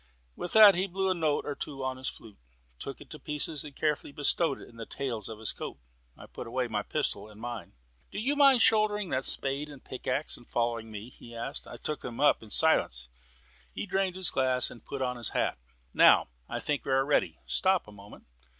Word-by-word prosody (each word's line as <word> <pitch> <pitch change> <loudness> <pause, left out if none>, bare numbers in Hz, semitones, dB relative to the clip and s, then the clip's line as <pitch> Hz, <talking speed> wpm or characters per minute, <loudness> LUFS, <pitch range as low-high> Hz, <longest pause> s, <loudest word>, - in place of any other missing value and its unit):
With 175 - -5
that 215 -2 +10
he 185 +2 0
blew 190 +1 0
a - - +4
note 160 -4 0
or 145 - -2
two 140 -1 -5
on 130 0 -2
his 130 - -5
flute, 110 -3 -13 0.4
took 135 - -6
it - - -13
to 155 - -7
pieces, 150 +1 -2
and 145 -2 -10
carefully 150 -2 -1
bestowed 145 +1 +1
it - - -11
in 115 - -16
the 115 - -6
tails 120 -7 -3
of 110 - -6
his 110 0 -3
coat. - - -6 0.4
I - - -11
put 120 - -8
away 125 +1 -1
my 110 -3 -1
pistol 105 -5 -2
in 105 - -14
mine. 120 0 -6 0.4
"Do - - -8
you 260 +8 +1
mind 275 -4 +6
shouldering 210 -3 +3
that 130 +1 0
spade 140 +2 0
and 140 -3 -12
pickaxe, 130 +3 -2
and 120 - -17
following 115 -1 -1
me?" 110 +3 -8
he 120 -1 -12
asked. 120 +5 -5
I - - -8
took 150 - -4
them 120 -1 -6
up 145 - +4
in 110 - -12
silence. 65 - +2 0.6
He - - -4
drained 190 -2 0
his 185 -2 0
glass 130 -1 +2
and 115 - -12
put 135 -1 -4
on 125 -1 -1
his 120 -3 0
hat. - - 0 0.3
"Now - - +6 0.2
I - - -2
think 145 -2 -1
we - - -3
are 135 0 +3
ready. 145 - +1
Stop 190 - +2
a - - -11
moment." 100 0 -14
135 Hz, 225 wpm, -30 LUFS, 115-160 Hz, 0.6 s, that